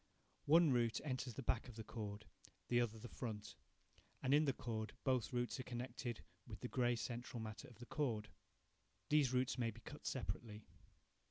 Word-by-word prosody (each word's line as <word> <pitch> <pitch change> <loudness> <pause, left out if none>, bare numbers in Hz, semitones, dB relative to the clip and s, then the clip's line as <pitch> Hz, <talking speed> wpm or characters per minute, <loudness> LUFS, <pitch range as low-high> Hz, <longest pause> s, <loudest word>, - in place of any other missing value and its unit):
One 165 0 +7
root 120 -3 +3
enters 130 -4 -2
the - - -4
back 120 +1 +1
of 120 - -9
the 110 - -5
cord, 105 -1 -5 0.4
the 120 0 +5
other 115 -2 0
the 110 - -7
front, 105 -4 -4 0.7
and, 135 +1 +4
in 150 +2 +7
the 140 - +4
cord, 110 -3 -3
both 130 -5 +2
roots 120 +1 0
are - - -2
connected 120 -1 -4 0.2
with - - -7
the - - -2
grey 120 -1 +3
central 120 +1 -3
matter 110 -1 -5
of 120 - -14
the 120 - -8
cord. 120 -9 0 0.8
These 150 -4 +5
roots 130 0 +2
may 115 -2 +2
be 115 +1 -9
cut 145 +2 -8
separately. 110 -3 -3
120 Hz, 180 wpm, -42 LUFS, 110-130 Hz, 0.8 s, One